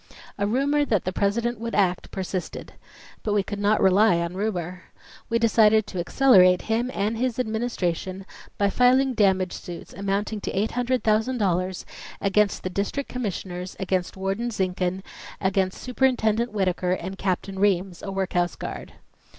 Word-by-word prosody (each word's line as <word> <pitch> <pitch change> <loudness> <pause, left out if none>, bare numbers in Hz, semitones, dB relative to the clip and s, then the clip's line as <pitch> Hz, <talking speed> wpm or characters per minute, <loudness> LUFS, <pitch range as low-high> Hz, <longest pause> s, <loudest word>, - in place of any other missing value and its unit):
A 200 - +1
rumor 280 +6 +2
that 215 -9 0
the 185 - -2
President 230 +4 0
would 230 0 -4
act 185 -3 +1
persisted. 185 -1 -5 0.5
But 210 -1 -1
we 200 - +2
could 200 +1 -5
not 205 +1 +2
rely 190 0 +5
on 170 +1 -2
rumor. 185 -3 -3 0.4
We 230 - +2
decided 220 -2 +4
to 185 - -6
accelerate 185 -3 +5
him 230 +3 0
and 215 0 -1
his 250 -2 0
Administration 200 -6 -2 0.3
by 200 -1 +2
filing 255 +3 +4
damage 190 -4 +2
suits 175 -3 -8
amounting 200 +2 -2
to - - -3
$800,000 215 -4 0 0.3
against 200 0 +1
the 185 - -3
District 205 +9 -2
Commissioners, 190 -6 -4
against 185 -1 -1
Warden 195 +5 -2
Zinkhan, 185 -3 -2 0.4
against 190 -1 0
Superintendent 245 -3 +1
Whittaker 185 -3 0
and 185 +1 -4
Captain 190 0 -2
Reams, 190 -3 +1
a 195 - -5
workhouse 180 -2 -1
guard. - - -7
200 Hz, 140 wpm, -25 LUFS, 185-225 Hz, 0.5 s, rely